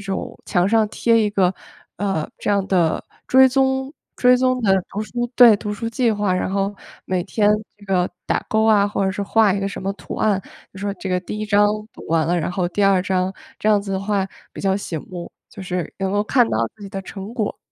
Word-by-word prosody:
种 195 -1 -5
墙 180 +1 +2
上 220 -1 +3
贴 230 +1 +2
一 215 - +2
个， 190 -3 +2 0.4
呃， 190 -6 -1
这 - - -4
样 200 -1 +2
的 175 -4 +1 0.2
追 260 0 +6
踪 265 +1 +1 0.2
追 250 0 +5
踪 255 0 +1
的 195 - +3 0.2
读 205 - -4
书 240 +2 -3
对， 235 -4 +8
读 210 0 -4
书 230 +2 -4
计 230 -1 +1
划， 205 -2 0
然 185 - -1
后 195 +1 -1 0.3
每 185 -1 -1
天 205 +1 +1 0.3
这 205 - -17
个 180 -2 +1 0.2
打 - - 0
勾 220 0 +3
啊， 210 -2 +5
或 205 - -2
者 190 - +1
是 200 +1 -3
画 215 0 +3
一 200 - -1
个 195 - -1
什 - - -7
么 195 - -1
图 - - -8
案， 205 -3 +1 0.3
就 - - -10
说 200 +1 -2
这 195 - -6
个 180 -1 +1
第 200 +3 -6
1 215 - -3
章 205 0 +4 0.3
读 - - -12
完 160 -1 +2
了， 175 +1 +1
然 165 - -2
后 175 -1 -1
第 200 +3 0
2 195 -2 +4
章， 185 0 0 0.3
这 - - -4
样 210 -1 +4
子 200 -1 -5
的 190 - 0
话 195 -1 0 0.3
比 - - -8
较 195 -1 +1
醒 170 -5 -4
目， 175 -2 -7 0.2
就 195 - -10
是 180 -2 -3
能 195 -1 -1
够 205 - +2
看 245 0 +3
到 - - 0 0.2
自 215 - -14
己 200 - -7
的 195 0 -5
成 195 +2 -8
果。 225 -4 -2
200 Hz, 250 characters per minute, -21 LUFS, 190-215 Hz, 0.4 s, 对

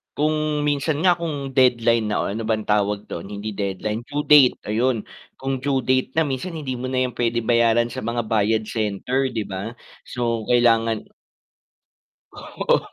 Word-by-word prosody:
kung 155 0 0
minsan 145 +1 0
nga 180 -2 +4
kung 145 -5 -4
deadline 115 -3 +4
na 105 - 0
o - - -2
ano 110 +3 -4
bang 110 -1 0
tawag 105 0 0
dun, 85 - -6
hindi 105 +1 -5
deadline, 105 +3 -3
due 145 +1 -2
date, 145 -4 +7
ayun. 115 +1 +1 0.3
Kung 135 0 -3
due 135 0 0
date 130 +1 +1
na 160 - +4
minsan 145 +5 -3
hindi 135 -5 -4
mo 130 +1 -4
na 130 0 0
yan 125 - -9
puwede 120 -1 0
bayaran 120 0 +3
sa 130 - -5
mga 120 +1 -1
bayad 110 0 +2
center 115 +5 -1
'di 115 -3 -2
ba, 95 +4 -5 0.3
so 115 -2 -2
kailangan 115 -2 +3 1.3
Oo, - - -1
120 Hz, 165 wpm, -22 LUFS, 110-135 Hz, 1.3 s, date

